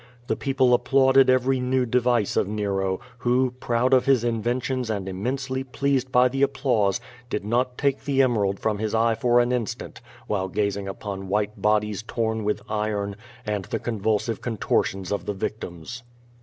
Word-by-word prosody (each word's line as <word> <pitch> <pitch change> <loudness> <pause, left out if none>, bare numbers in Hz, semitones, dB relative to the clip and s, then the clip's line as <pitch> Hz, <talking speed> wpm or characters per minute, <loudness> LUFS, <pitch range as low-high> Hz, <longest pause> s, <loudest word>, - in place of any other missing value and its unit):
The - - 0
people 130 -2 +2
applauded 135 +1 +4
every 130 +1 +3
new 125 0 +1
device 120 -3 +1
of - - +2
Nero, 100 -2 -1 0.2
who, 125 +1 +2
proud 120 +2 +1
of 130 0 +4
his 130 -4 +4
inventions 120 +2 -1
and 100 -3 -2
im 95 +1 -5
mensely 130 +1 -2
pleased 135 0 -1
by 125 0 +5
the 135 +2 -3
applause, 120 -8 +2 0.3
did 105 - -3
not 125 +3 0
take 140 -1 0
the 135 -2 +3
emerald 105 -6 +1
from 105 -2 -1
his 110 0 -1
eye 115 +1 +3
for 120 +2 +3
an 120 0 +2
instant 120 -4 -3 0.2
while 95 -3 -1
gazing 100 0 -1
upon 95 0 -6
white 105 +2 -1
bodies 105 -1 +1
torn 110 -1 -2
with 105 0 -1
iron, 105 -2 -2 0.3
and 105 -3 -2
the - - -2
convulsive 110 0 -1
contortions 95 -4 -1
of 100 - -2
the 105 - -1
victims. 95 +3 -5
115 Hz, 170 wpm, -24 LUFS, 105-125 Hz, 0.3 s, by